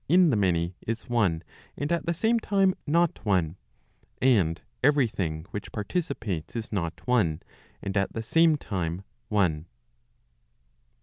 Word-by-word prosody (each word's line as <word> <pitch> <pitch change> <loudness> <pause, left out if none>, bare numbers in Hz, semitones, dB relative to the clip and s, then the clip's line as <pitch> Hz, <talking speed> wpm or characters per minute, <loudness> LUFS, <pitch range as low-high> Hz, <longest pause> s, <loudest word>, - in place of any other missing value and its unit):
in 175 -1 +6
the - - +2
many, 90 -3 +1
is 115 +2 -3
one 95 -9 +1 0.3
and 145 +3 -2
at 170 0 0
the 170 - +2
same 230 +6 +2
time 195 -3 +2
not 170 +2 +2
one; 90 -6 +1 0.6
and 95 -11 +3 0.2
every 145 0 +4
thing 80 -7 -3
which 105 - -6
participates 110 - -3
is 115 -1 -4
not 85 -6 -3
one, 100 -11 +2 0.4
and 100 0 -3
at 100 -1 +1
the 115 - -3
same 165 +5 +4
time 90 - -3 0.3
one. 90 -7 +1
105 Hz, 140 wpm, -27 LUFS, 85-145 Hz, 0.6 s, in